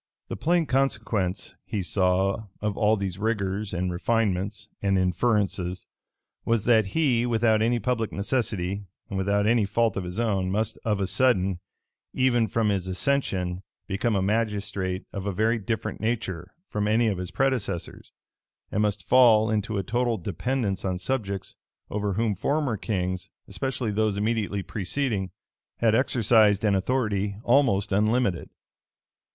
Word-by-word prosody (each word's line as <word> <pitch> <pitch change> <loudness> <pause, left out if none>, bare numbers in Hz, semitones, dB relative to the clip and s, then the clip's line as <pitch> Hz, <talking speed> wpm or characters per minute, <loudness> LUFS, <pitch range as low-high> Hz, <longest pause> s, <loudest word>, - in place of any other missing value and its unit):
The - - -3
plain 170 +1 +1
consequence, 115 -9 -1
he 100 -3 -3
saw, 95 +3 +1
of 105 -1 -2
all 110 +1 +3
these 95 -2 -3
rigors, 105 -2 -1
and 90 +1 -1
refinements, 105 +1 -1
and 100 -1 +2
inferences, 95 -1 0 0.6
was, 115 -3 +1
that 110 -4 +4
he, 125 -7 +2
without 110 -2 +2
any 120 +2 +2
public 115 -1 -1
necessity, 100 -3 -2 0.2
and 100 - -3
without 100 +1 +1
any 115 0 +3
fault 110 +1 +1
of 95 - -2
his 90 +4 -5
own, 100 -5 0
must 105 +3 -1
of 105 -3 0
a 100 - +1
sudden, 95 -6 +2 0.6
even 120 -3 +3
from 110 -1 +1
his 95 -2 -1
accession, 95 -4 -1 0.2
become 105 +3 -1
a 95 - +1
magistrate 100 -3 -1
of 100 0 -4
a - - 0
very 110 +4 +1
different 110 +2 -3
nature 95 -6 -2 0.2
from 105 0 -2
any 115 +2 +3
of 100 -4 -1
his 90 -1 -3
predecessors, 130 -10 -2 0.6
and 105 - 0
must 105 -3 0
fall 115 -4 +6
into 110 0 -1
a 100 - -1
total 120 +3 0
dependence 105 +1 -2
on 95 -1 -1
subjects 100 -1 -3 0.4
over 105 -1 -1
whom 110 +1 +1
former 140 +5 0
kings, 95 -3 -3 0.2
especially 130 -4 -2
those 105 -1 +1
immediately 105 -2 -1
preceding, 105 -1 -2 0.5
had 115 -2 +3
exercised 110 -5 +3
an 105 - +3
authority 100 -1 0
almost 120 -7 +3
unlimited. 105 -1 +1
105 Hz, 145 wpm, -26 LUFS, 95-115 Hz, 0.6 s, fall